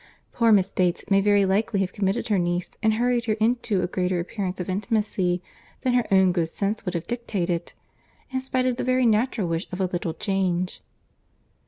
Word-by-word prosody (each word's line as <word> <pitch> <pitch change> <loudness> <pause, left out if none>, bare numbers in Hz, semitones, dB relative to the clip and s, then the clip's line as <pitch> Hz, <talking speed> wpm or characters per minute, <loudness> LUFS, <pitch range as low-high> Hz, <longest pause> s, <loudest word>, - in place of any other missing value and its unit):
Poor 230 -1 +3
Miss 195 -3 +3
Bates 180 -2 0
may 195 0 +5
very 205 0 +4
likely 200 +2 +1
have 185 -1 -2
committed 200 +3 -1
her 205 -3 +3
niece 175 0 -1
and 220 -1 +3
hurried 240 0 +1
her 220 - +1
into 220 -3 +1
a - - 0
greater 180 0 -1
appearance 185 +1 -4
of 180 - -3
intimacy 195 -3 0 0.4
than 255 -2 +1
her 245 -1 +2
own 190 -1 +5
good 170 -2 0
sense 205 +5 -2
would 180 -1 -3
have 170 - -3
dictated, 190 -8 -2 0.6
in 260 - 0
spite 260 -1 -1
of 250 -1 0
the - - -2
very 255 0 +2
natural 220 -2 +2
wish 165 +2 -2
of 180 - -5
a 190 - +2
little 175 -2 -3
change." 185 -3 -1
195 Hz, 195 wpm, -25 LUFS, 180-230 Hz, 0.6 s, may